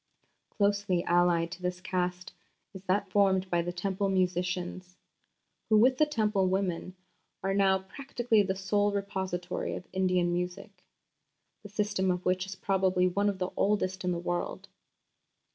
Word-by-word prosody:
Closely 200 -3 +1
allied 175 -1 +2
to 180 0 -8
this 180 0 -2
Caste 180 0 -3 0.4
is 190 - -9
that 190 +2 0
formed 190 -2 +3
by 175 -1 +2
the 175 +1 -3
Temple 195 +2 -1
musicians, 180 0 -1 0.7
who 215 - +5
with 255 +4 +4
the 305 - +5
Temple 210 -8 +1
woman 185 -1 -1 0.5
are 195 0 0
"now 195 -1 +4
practically 230 +3 0
the 190 -1 -1
sole 205 +2 +1
repository 190 -3 -3
of 180 - -8
Indian 180 -2 +1
music, 180 +2 -5 0.8
the 205 - -10
system 205 -2 0
of 180 0 -1
which 185 +1 +1
is 195 - -6
probably 185 -2 +2
one 200 +3 +1
of 200 - -3
the 185 0 -2
oldest 190 -2 0
in 180 - 0
the 175 - -1
world." 175 0 -3
190 Hz, 150 wpm, -29 LUFS, 180-200 Hz, 0.8 s, who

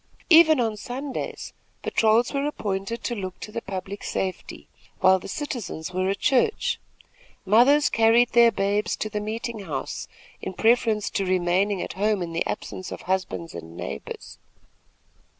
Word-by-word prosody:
Even 315 -3 +8
on 225 -3 0
Sundays, 260 +5 -5 0.3
patrols 225 +3 +3
were 280 +1 0
appointed 205 -4 -3
to 240 - -1
look 185 -4 -5
to 210 - -8
the 230 - -4
public 195 0 -6
safety 190 -1 -4 0.3
while 190 0 +5
the - - -9
citizens 225 - -5
were 185 +1 0
at 200 - 0
church. 425 - +1 0.7
Mothers 250 +9 +5
carried 230 +2 +4
their 235 -1 +6
babes 200 +1 0
to 215 - -4
the 210 0 -2
meeting 225 +2 -4
house 170 -8 -5 0.3
in 190 - -5
preference 225 -1 +2
to 200 - 0
remaining 185 +1 +1
at - - -6
home 205 -1 +1
in 165 -1 -6
the 165 - 0
absence 185 -2 -5
of - - -6
husbands 185 -3 -2
and 85 0 -9
neighbors. - - -7
210 Hz, 150 wpm, -25 LUFS, 190-235 Hz, 0.7 s, Even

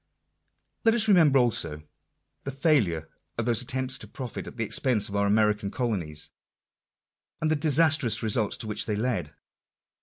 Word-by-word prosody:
Let 225 0 +4
us 220 -2 +4
remember 165 -9 +5
also, 85 - 0 0.6
the - - -6
failure 130 - +1 0.3
of 115 - -1
those 120 -1 +2
attempts 130 0 -3
to 105 - -10
profit 125 +2 -7
at - - -10
the 115 - -1
expense 110 -1 +1
of 100 - -7
our 100 0 +1
American 105 -1 +1
colonies; 90 -12 -3 1.1
and 155 0 0
the - - +3
disastrous 145 -6 +2
results 110 -1 0
to 110 - -5
which 105 - -2
they 105 - -1
led. 105 - -2
115 Hz, 155 wpm, -26 LUFS, 105-140 Hz, 1.1 s, remember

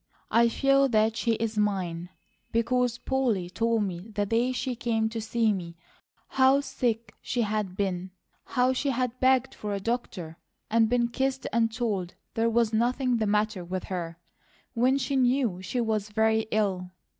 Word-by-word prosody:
I 235 +1 +5
feel 275 +3 +3
that 220 -1 +2
she 230 +1 +1
is 220 -1 -2
mine, 180 -4 -1 0.4
because 245 +1 +1
Polly 235 -11 -1
told 230 +1 +1
me 185 +1 -5
the 205 -1 -1
day 230 +4 +1
she 250 0 -2
came 225 -2 0
to 225 0 -4
see 225 0 +1
me 170 -3 -6 0.5
how 265 +1 +4
sick 230 -5 -2
she 240 -2 -1
had 210 -3 -2
been, 185 -2 -2 0.4
how 255 0 +2
she 280 +2 -1
had 255 -1 -1
begged 260 0 +3
for 210 -1 -4
a - - -2
doctor, 195 -7 -4 0.3
and 225 0 +4
been 240 -1 +2
kissed 265 +2 -1
and 225 -1 +2
told 210 -7 -2 0.2
there 230 +1 +1
was 230 -1 +2
nothing 245 +2 +1
the 215 -1 0
matter 210 -2 0
with 185 +1 -4
her, 170 -2 -4 0.6
when 255 +3 +3
she 275 0 -1
knew 245 -7 +2
she 190 +7 -3
was 215 -3 -1
very 220 +1 +2
ill. 195 -4 0
225 Hz, 170 wpm, -27 LUFS, 205-245 Hz, 0.6 s, I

